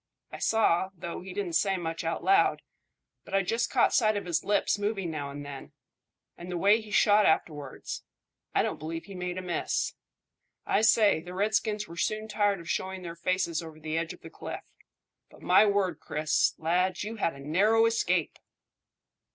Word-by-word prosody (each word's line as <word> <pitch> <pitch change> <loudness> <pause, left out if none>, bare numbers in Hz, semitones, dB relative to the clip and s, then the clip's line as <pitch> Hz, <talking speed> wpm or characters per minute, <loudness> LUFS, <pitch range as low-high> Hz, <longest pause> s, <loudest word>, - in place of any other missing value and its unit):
I - - -8
saw, 190 -5 +2
though 170 +1 -6
he 185 +1 -8
didn't 185 -3 -3
say 195 +3 +2
much 165 -1 -4
out 165 0 -2
loud, 390 +1 +3 0.6
but 195 - -5
I 195 - +3
just 230 +5 0
caught - - +3
sight 215 -3 +3
of 200 - -4
his 175 -2 0
lips 205 0 +1
moving 205 -4 -2
now 145 -3 -4
and 145 +1 -7
then; 140 -1 -9 0.6
and 175 +1 -10
the 175 - -2
way 205 +5 +4
he 215 - -12
shot 210 0 +5
afterwards 145 -4 -2 0.5
I - - +4
don't - - -3
believe 165 +2 -5
he 200 - -10
made 180 0 -4
a 185 - -4
miss. 175 -1 -1 0.7
I 205 - +2
say, 215 -6 +4
the 180 +2 -9
redskins 210 +1 0
were 170 - -11
soon 215 +4 -1
tired 205 -2 +1
of 170 - -11
showing 190 +1 -3
their 170 -1 -6
faces 170 -1 -1
over 160 -2 -10
the 155 0 -4
edge 165 0 -1
of - - -12
the - - -11
cliff. - - -7 0.7
But, - - -18
my 215 - +6
word, 195 -5 +1
Chris, 150 0 +1
lad, 180 +4 0
you 220 +2 -5
had 165 -7 0
a - - -12
narrow 200 +11 +3
escape!" 185 -8 0
185 Hz, 190 wpm, -28 LUFS, 165-210 Hz, 0.7 s, my